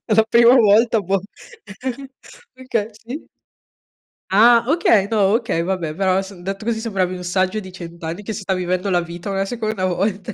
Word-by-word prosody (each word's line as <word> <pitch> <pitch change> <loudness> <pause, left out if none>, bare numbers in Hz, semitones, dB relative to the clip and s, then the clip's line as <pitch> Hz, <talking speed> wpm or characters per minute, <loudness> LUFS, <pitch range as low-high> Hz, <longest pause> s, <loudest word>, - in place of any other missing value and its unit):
la 220 0 +4
prima 235 +1 +6
volta 225 0 +4
bom, 195 0 0 1.4
okay, 240 -5 -2
sì. 250 +7 -8 1.0
Ah, 230 +4 +6
okay. 225 - +3
No. 205 -2 +3
Okay, 165 -7 -1
vabbè, 170 -4 -2
però 190 0 +1
s 195 +1 -10
detto 195 +3 -5
così 230 0 -1
sembravi 195 -5 -2
un 180 - -8
saggio 185 +3 0
di 190 -3 -8
100 170 -2 -10
anni 165 +5 -5
che 220 - -5
si 215 - -6
sta 190 0 -1
vivendo 185 +1 -2
la 180 -2 +2
vita 175 +2 -7
una 195 0 -1
seconda 215 -2 -3
volta. 190 +1 -2
195 Hz, 175 wpm, -20 LUFS, 185-220 Hz, 1.4 s, prima